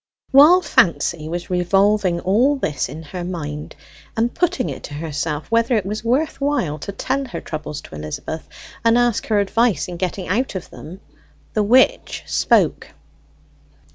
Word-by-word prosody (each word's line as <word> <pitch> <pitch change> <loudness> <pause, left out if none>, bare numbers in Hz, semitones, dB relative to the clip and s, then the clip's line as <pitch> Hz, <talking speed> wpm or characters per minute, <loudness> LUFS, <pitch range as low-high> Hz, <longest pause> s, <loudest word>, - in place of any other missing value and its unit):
While 305 +7 +7
Fancy 170 - +1
was 175 +2 -5
revolving 185 0 +2
all 240 +10 +3
this 150 - -2
in 155 +4 -8
her 175 +3 -6
mind, 150 -4 -5 0.4
and 230 +2 +1
putting 350 -7 0
it - - -6
to 145 - -8
herself 150 +2 -4
whether 230 +1 +3
it 210 -4 0
was 210 +2 -4
worth 275 +5 0
while 275 - 0
to 200 - -5
tell 270 +7 -2
her 245 - -6
troubles 155 -1 -6
to - - -14
Elizabeth, 75 - -6 0.3
and 230 +1 +4
ask 240 -2 +1
her 215 -2 +2
advice 205 - +1
in 175 -1 -6
getting 185 +1 -3
out 220 +4 -1
of 185 - -6
them, 180 +5 -10 0.5
the 215 - +1
witch 255 - +3
spoke. - - +2
195 Hz, 160 wpm, -20 LUFS, 165-240 Hz, 0.5 s, While